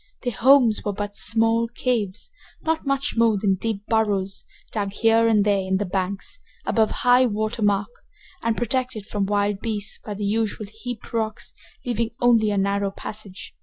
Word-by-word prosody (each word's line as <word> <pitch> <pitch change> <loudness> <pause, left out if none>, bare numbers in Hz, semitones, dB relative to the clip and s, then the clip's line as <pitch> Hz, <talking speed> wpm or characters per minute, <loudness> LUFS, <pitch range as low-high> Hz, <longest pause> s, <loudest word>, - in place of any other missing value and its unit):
Their 245 -2 -1
homes 245 -1 +5
were 205 - -1
but 205 0 -5
small 225 +1 +2
caves, 230 -4 -2 0.3
not 320 -2 -1
much 275 0 0
more 230 -2 +4
than 195 -1 +2
deep 205 +1 -3
burrows, 200 -4 0 0.3
dug 200 -2 -2
here 225 +1 +4
and 210 -2 +3
there 205 -1 +3
in 190 0 0
the 205 - -1
banks, 195 - -3 0.3
above 220 -1 +2 0.2
high 250 +1 +6
water 215 +1 -2
mark, 205 +1 +1 0.5
and 230 -1 0
protected 245 -3 -1
from 205 -2 -2
wild 205 -1 +1
beasts 215 -2 -3
by 210 - -5
the 205 +1 -3
usual 215 +1 -1
heaped 220 +3 -8
rocks, 220 -1 -2 0.3
leaving 235 -2 0
only 230 -3 +4
a 205 - 0
narrow 200 0 +1
passage. 200 -1 -8
215 Hz, 165 wpm, -23 LUFS, 200-230 Hz, 0.5 s, high